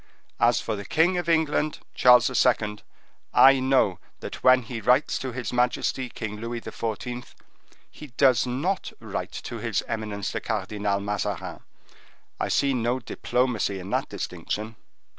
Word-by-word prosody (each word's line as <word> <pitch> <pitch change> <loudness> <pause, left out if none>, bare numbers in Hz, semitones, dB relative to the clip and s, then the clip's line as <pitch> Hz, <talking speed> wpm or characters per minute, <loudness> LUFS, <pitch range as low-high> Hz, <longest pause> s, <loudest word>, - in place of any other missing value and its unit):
As 120 -2 +4
for 110 - -3
the 100 - -6
king 175 - +2
of 170 -1 -3
England, 155 -2 +1 0.2
Charles 125 -1 +6 0.2
II., 105 -4 +1 0.6
I 135 0 +7
know 130 -8 +2 0.2
that - - -7
when 130 0 +6
he 115 0 -6
writes 125 +7 +3
to 130 - -4
his 120 0 -5
majesty 125 +1 0
King 110 -2 -6
Louis 115 +2 -4
XIV., 120 +2 -5 0.7
he 150 - -11
does 130 -2 +4
not 150 +11 -2
write - - -5
to - - -6
his - - -1
eminence 105 -3 -3
the - - -3
Cardinal 100 -1 -1
Mazarin. 100 0 -3 0.8
I - - 0
see 140 -1 +2
no 120 0 0
diplomacy 125 -7 -1
in 95 +2 -8
that - - 0
distinction." 110 +2 -4
120 Hz, 145 wpm, -25 LUFS, 105-130 Hz, 0.8 s, I